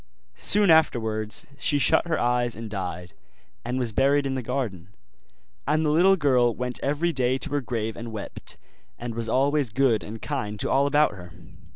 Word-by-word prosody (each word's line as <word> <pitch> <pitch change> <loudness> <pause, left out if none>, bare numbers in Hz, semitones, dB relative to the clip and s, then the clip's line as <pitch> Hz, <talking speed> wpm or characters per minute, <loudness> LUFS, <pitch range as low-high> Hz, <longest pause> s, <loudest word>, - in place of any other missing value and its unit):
Soon 205 - +4
afterwards 110 -9 +1
she 145 - +2
shut 145 +4 +3
her 160 - 0
eyes 120 0 0
and 110 -1 -8
died, 90 -3 -5 0.5
and 125 - -3
was 125 -3 -1
buried 140 +4 +2
in 135 - -1
the 130 - -2
garden; 115 -8 -4 0.8
and 155 +1 +1
the 150 - +2
little 180 +5 +5
girl 125 -8 +2
went 125 0 -4
every 155 +5 0
day 130 -1 +1
to 145 - -4
her 145 0 0
grave 115 -3 -3
and 115 0 -7
wept, 105 -2 -8 0.4
and 120 -1 -6
was 115 0 -4
always 140 +2 +1
good 115 -2 +1
and 110 +2 -8
kind 105 -8 -4
to - - -1
all 140 +1 +3
about 150 +1 +3
her. 90 -3 -11
125 Hz, 185 wpm, -25 LUFS, 110-145 Hz, 0.8 s, little